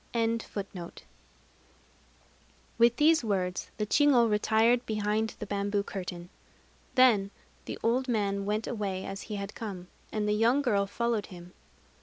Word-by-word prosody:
With 235 Hz, 0 st, +5 dB
these 315 Hz, -1 st, +4 dB
words, 185 Hz, -4 st, -2 dB
the 210 Hz, -, -1 dB
chigo 255 Hz, 0 st, +4 dB
retired 220 Hz, +3 st, +3 dB
behind 215 Hz, +1 st, -1 dB
the -, -, -6 dB
bamboo 200 Hz, 0 st, -1 dB
curtain. 180 Hz, -3 st, -6 dB, 0.7 s
Then 230 Hz, -7 st, +5 dB, 0.4 s
the -, -, -5 dB
old 250 Hz, +3 st, +1 dB
man 200 Hz, -4 st, 0 dB
went 210 Hz, +2 st, -1 dB
away 195 Hz, -5 st, -3 dB
as 195 Hz, 0 st, -6 dB
he 210 Hz, -, -3 dB
had 200 Hz, +1 st, -5 dB
come; 185 Hz, -5 st, -7 dB, 0.2 s
and 210 Hz, -1 st, -1 dB
the 210 Hz, -, +2 dB
young 235 Hz, +6 st, +3 dB
girl 200 Hz, -6 st, +1 dB
followed 235 Hz, +1 st, -1 dB
him. 180 Hz, 0 st, -12 dB
210 Hz, 130 wpm, -29 LUFS, 200-235 Hz, 0.7 s, With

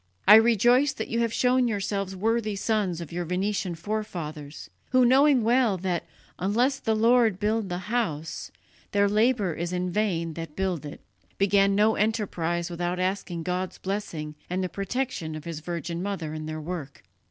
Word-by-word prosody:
I 205 Hz, -, +10 dB
rejoice 240 Hz, +5 st, +5 dB
that -, -, -5 dB
you 230 Hz, -, 0 dB
have 230 Hz, -1 st, +1 dB
shown 250 Hz, +1 st, +2 dB
yourselves 195 Hz, -3 st, -2 dB
worthy 215 Hz, +1 st, 0 dB
sons 195 Hz, -4 st, -1 dB
of 170 Hz, -, -8 dB
your 175 Hz, +1 st, -2 dB
Venetian 185 Hz, +1 st, -1 dB
forefathers, 165 Hz, -6 st, -5 dB, 0.2 s
who, 255 Hz, -1 st, +4 dB
knowing 265 Hz, 0 st, +5 dB
well 235 Hz, -3 st, +3 dB
that 180 Hz, -2 st, -2 dB, 0.3 s
'unless 240 Hz, +9 st, +1 dB
the 220 Hz, -4 st, 0 dB
Lord 225 Hz, -3 st, +4 dB
build 215 Hz, -1 st, 0 dB
the 175 Hz, -, -2 dB
house, 165 Hz, -9 st, -2 dB, 0.4 s
their 200 Hz, 0 st, +4 dB
labour 210 Hz, -3 st, +2 dB
is 170 Hz, +2 st, -4 dB
in 180 Hz, 0 st, -2 dB
vain 175 Hz, -5 st, 0 dB
that 165 Hz, -2 st, -7 dB
build 180 Hz, -5 st, -2 dB
it,' 145 Hz, -, -10 dB, 0.4 s
began 200 Hz, 0 st, +3 dB
no 215 Hz, +2 st, +4 dB
enterprise 180 Hz, -6 st, -1 dB
without 175 Hz, +1 st, -3 dB
asking 185 Hz, -2 st, -2 dB
God's 180 Hz, +2 st, -3 dB
blessing 175 Hz, -6 st, -4 dB, 0.2 s
and 185 Hz, +1 st, -1 dB
the 185 Hz, -, -2 dB
protection 200 Hz, -4 st, -3 dB
of 155 Hz, -, -7 dB
His 165 Hz, -2 st, -5 dB
Virgin 170 Hz, +1 st, -4 dB
Mother 185 Hz, -6 st, -3 dB
in 155 Hz, 0 st, -5 dB
their 155 Hz, 0 st, -4 dB
work." 155 Hz, -4 st, -6 dB
195 Hz, 165 wpm, -26 LUFS, 170-220 Hz, 0.4 s, I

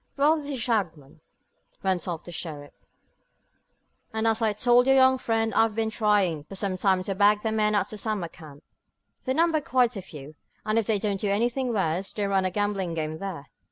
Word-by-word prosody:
"Well, 300 Hz, +3 st, +4 dB
this 290 Hz, -2 st, -7 dB
is 270 Hz, -3 st, -3 dB
Shagmon," 170 Hz, -, -2 dB, 0.6 s
went 190 Hz, -2 st, 0 dB
on 170 Hz, -3 st, -3 dB
the 175 Hz, -, -9 dB
sheriff, 150 Hz, -4 st, -7 dB, 1.4 s
"and, 220 Hz, 0 st, -2 dB
as 225 Hz, 0 st, +2 dB
I 220 Hz, -1 st, +2 dB
told 245 Hz, +4 st, +3 dB
your 270 Hz, -, +5 dB
young 260 Hz, 0 st, +5 dB
friend, 225 Hz, -1 st, 0 dB
I've 225 Hz, -1 st, +2 dB
been 220 Hz, -1 st, -1 dB
trying 205 Hz, -9 st, +1 dB
for 195 Hz, -, -10 dB
some 195 Hz, -1 st, -2 dB
time 185 Hz, 0 st, +1 dB
to 195 Hz, -, -2 dB
bag 205 Hz, +2 st, +3 dB
the 220 Hz, -, 0 dB
men 215 Hz, -1 st, +1 dB
at 200 Hz, -1 st, 0 dB
the 215 Hz, -, -6 dB
summer 210 Hz, -5 st, -2 dB
camp. 155 Hz, -3 st, -14 dB, 0.6 s
They 260 Hz, -1 st, 0 dB
number 325 Hz, -1 st, +2 dB
quite 250 Hz, -3 st, +1 dB
a 195 Hz, -, -4 dB
few, 150 Hz, -4 st, -11 dB, 0.3 s
and 215 Hz, +1 st, +2 dB
if 225 Hz, -, -3 dB
they 220 Hz, -2 st, +2 dB
don't 200 Hz, -1 st, -2 dB
do 205 Hz, -, 0 dB
anything 240 Hz, +5 st, 0 dB
worse, 190 Hz, -3 st, -1 dB
they 205 Hz, -, -2 dB
run 195 Hz, -1 st, +1 dB
a -, -, +1 dB
gambling 195 Hz, -3 st, -2 dB
game 155 Hz, 0 st, -3 dB
there. 180 Hz, -8 st, -6 dB
205 Hz, 205 wpm, -26 LUFS, 185-225 Hz, 1.4 s, your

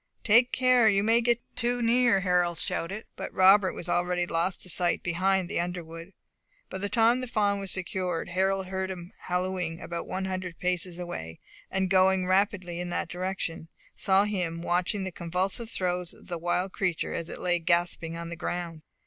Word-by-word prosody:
"Take 235 Hz, +3 st, +5 dB
care, 255 Hz, -3 st, +4 dB
you 200 Hz, -1 st, +2 dB
may 225 Hz, +2 st, +4 dB
get 240 Hz, 0 st, +2 dB, 0.2 s
too 245 Hz, +1 st, 0 dB
near," 235 Hz, -3 st, +3 dB
Harold 180 Hz, -2 st, +2 dB
shouted; 195 Hz, +6 st, -2 dB
but -, -, -6 dB
Robert 190 Hz, +1 st, +6 dB
was 175 Hz, -, -7 dB
already 175 Hz, 0 st, +1 dB
lost 175 Hz, +2 st, -1 dB
to -, -, -8 dB
sight 175 Hz, 0 st, +1 dB
behind 185 Hz, +2 st, +1 dB
the -, -, -2 dB
underwood. 170 Hz, 0 st, -5 dB, 0.6 s
By 190 Hz, -, -4 dB
the 205 Hz, +1 st, -2 dB
time 230 Hz, +4 st, +4 dB
the 255 Hz, -, -4 dB
fawn 205 Hz, -3 st, +1 dB
was 195 Hz, -1 st, -4 dB
secured, 180 Hz, -3 st, -2 dB
Harold 190 Hz, +2 st, +1 dB
heard 190 Hz, 0 st, -3 dB
him 175 Hz, -1 st, -7 dB
hallooing 180 Hz, -2 st, -1 dB
about 170 Hz, 0 st, -5 dB
one 190 Hz, 0 st, -3 dB
hundred 185 Hz, -2 st, -4 dB
paces 180 Hz, -1 st, -1 dB
away, 80 Hz, -, -6 dB, 0.3 s
and 190 Hz, 0 st, 0 dB
going 190 Hz, 0 st, +4 dB
rapidly 185 Hz, -2 st, +1 dB
in 175 Hz, 0 st, -4 dB
that 175 Hz, 0 st, -2 dB
direction, 180 Hz, -2 st, -4 dB, 0.3 s
saw 195 Hz, 0 st, +3 dB
him 175 Hz, -5 st, -2 dB
watching 180 Hz, +3 st, 0 dB
the 190 Hz, -, -4 dB
convulsive 185 Hz, +7 st, -2 dB
throes 180 Hz, -3 st, -2 dB
of -, -, -18 dB
the 170 Hz, -1 st, -3 dB
wild 180 Hz, +3 st, -1 dB
creature 180 Hz, -4 st, -1 dB
as 165 Hz, -, -4 dB
it -, -, -6 dB
lay 175 Hz, -1 st, +1 dB
gasping 170 Hz, 0 st, 0 dB
on 170 Hz, 0 st, -6 dB
the 170 Hz, -, -5 dB
ground. 170 Hz, -2 st, -4 dB
185 Hz, 185 wpm, -28 LUFS, 175-195 Hz, 0.6 s, Robert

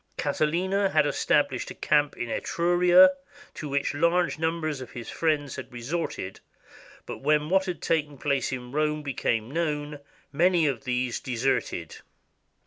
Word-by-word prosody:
Catiline 155 Hz, +6 st, 0 dB, 0.2 s
had 155 Hz, -1 st, +4 dB
established 145 Hz, -2 st, +1 dB
a -, -, -8 dB
camp 145 Hz, -1 st, +1 dB
in 120 Hz, -, -3 dB
Etruria, 175 Hz, +6 st, +4 dB, 0.4 s
to 150 Hz, -, -6 dB
which 140 Hz, +1 st, 0 dB
large 170 Hz, +2 st, +1 dB
numbers 160 Hz, -3 st, -1 dB
of 130 Hz, -, -9 dB
his 120 Hz, -2 st, -7 dB
friends 150 Hz, -4 st, -1 dB
had 130 Hz, -, -8 dB
resorted, 120 Hz, -, -4 dB, 0.7 s
but -, -, -7 dB
when 150 Hz, +2 st, +1 dB
what 190 Hz, 0 st, +3 dB
had 180 Hz, -5 st, -5 dB
taken 150 Hz, -3 st, 0 dB
place 140 Hz, -2 st, 0 dB
in 125 Hz, -2 st, -6 dB
Rome 150 Hz, +1 st, 0 dB
became 120 Hz, -4 st, -1 dB
known, 150 Hz, -2 st, -2 dB, 0.3 s
many 170 Hz, +2 st, +3 dB
of 135 Hz, -2 st, -1 dB
these 125 Hz, -1 st, -1 dB
de 125 Hz, -, -5 dB
serted. 135 Hz, +4 st, -1 dB
150 Hz, 145 wpm, -26 LUFS, 135-165 Hz, 0.7 s, had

